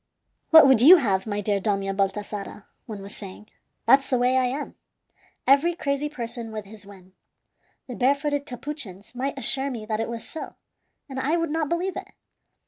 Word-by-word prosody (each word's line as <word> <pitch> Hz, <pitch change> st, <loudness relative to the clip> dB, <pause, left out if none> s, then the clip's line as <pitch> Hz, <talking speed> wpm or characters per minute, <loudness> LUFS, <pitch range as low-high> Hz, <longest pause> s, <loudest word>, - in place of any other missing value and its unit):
"What 320 Hz, -2 st, +9 dB
would 265 Hz, -4 st, +5 dB
you 320 Hz, +9 st, +10 dB
have, 200 Hz, -, 0 dB
my 205 Hz, -1 st, -2 dB
dear 205 Hz, 0 st, 0 dB
Dona 195 Hz, -1 st, -1 dB
Baltasara?" 200 Hz, +1 st, -3 dB, 0.2 s
one 210 Hz, -4 st, -7 dB
was 200 Hz, -, -8 dB
saying. 200 Hz, +1 st, -10 dB, 0.4 s
"That's 270 Hz, +4 st, +4 dB
the 255 Hz, -, +2 dB
way 250 Hz, +1 st, +2 dB
I 260 Hz, -1 st, +3 dB
am. 275 Hz, +4 st, -4 dB, 0.7 s
Every 285 Hz, +6 st, +4 dB
crazy 285 Hz, -2 st, -2 dB
person 235 Hz, -4 st, -6 dB
with 215 Hz, -1 st, -6 dB
his 205 Hz, 0 st, -12 dB
whim. 190 Hz, -2 st, -15 dB, 0.7 s
The 250 Hz, -, -7 dB
barefooted 285 Hz, +3 st, 0 dB
Capuchins 245 Hz, -, -8 dB
might 270 Hz, +3 st, -3 dB
assure 270 Hz, +2 st, -1 dB
me 230 Hz, -5 st, -6 dB
that 215 Hz, 0 st, -2 dB
it 225 Hz, -, -2 dB
was 230 Hz, -1 st, -6 dB
so, 320 Hz, -, -8 dB, 0.5 s
and 265 Hz, -2 st, -6 dB
I 295 Hz, +6 st, +1 dB
would 330 Hz, -2 st, -1 dB
not 315 Hz, -2 st, -1 dB
believe 360 Hz, +3 st, -1 dB
it. -, -, -8 dB
245 Hz, 180 wpm, -24 LUFS, 205-280 Hz, 0.7 s, you